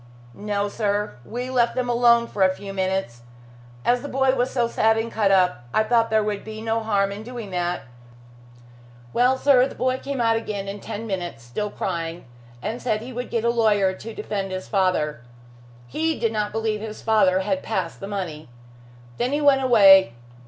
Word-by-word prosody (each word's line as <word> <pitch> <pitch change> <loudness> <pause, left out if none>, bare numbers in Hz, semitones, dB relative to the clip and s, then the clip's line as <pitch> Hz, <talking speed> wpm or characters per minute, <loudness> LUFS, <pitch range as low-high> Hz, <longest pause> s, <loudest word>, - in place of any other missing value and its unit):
"No, 205 +2 -2
sir. 205 - -1
We 245 - -5
left 240 -2 +2
them 255 -1 -1
alone 235 -1 +4
for 210 - -6
a 190 - +6
few 195 0 -8
minutes. 190 -11 -2 0.6
As 245 0 +3
the 285 - -6
boy 265 0 +2
was 250 -1 0
so 240 -3 0
sad 225 -1 +2
and 225 +1 -2
cut 210 -2 +1
up, 180 -10 +2
I 215 - +4
thought 230 0 +2
there 220 -1 +2
would 210 -1 -3
be 215 0 -8
no 225 +1 -1
harm 200 -3 0
in 200 +1 -6
doing 230 -3 -8
that. 175 -3 -2 1.3
Well, 250 +2 +3
sir, 265 -2 +4
the - - -11
boy 255 0 0
came 275 -1 -4
out 230 -1 +3
again 205 -3 -4
in 200 +1 -5
ten 220 +2 -6
minutes, 175 - -4
still 205 - -4
crying, 170 -3 -4 0.4
and 225 +4 -4
said 220 -3 -1
he 250 +3 -8
would 245 +1 -5
get 230 -1 -1
a 235 - +3
lawyer 210 -5 +2
to 220 +3 -9
defend 200 -2 -4
his 185 0 -5
father. 180 - 0 0.6
He 320 - -1
did 230 - +1
not 210 -1 -1
believe 220 -1 -2
his 215 -1 -7
father 190 -4 +3
had 280 +9 -1
passed 185 -6 -3
the 195 - -6
money. 170 -8 -5 0.7
Then 245 +2 0
he 290 - +1
went 285 -2 +4
away. 195 - +6
215 Hz, 195 wpm, -23 LUFS, 195-235 Hz, 1.3 s, a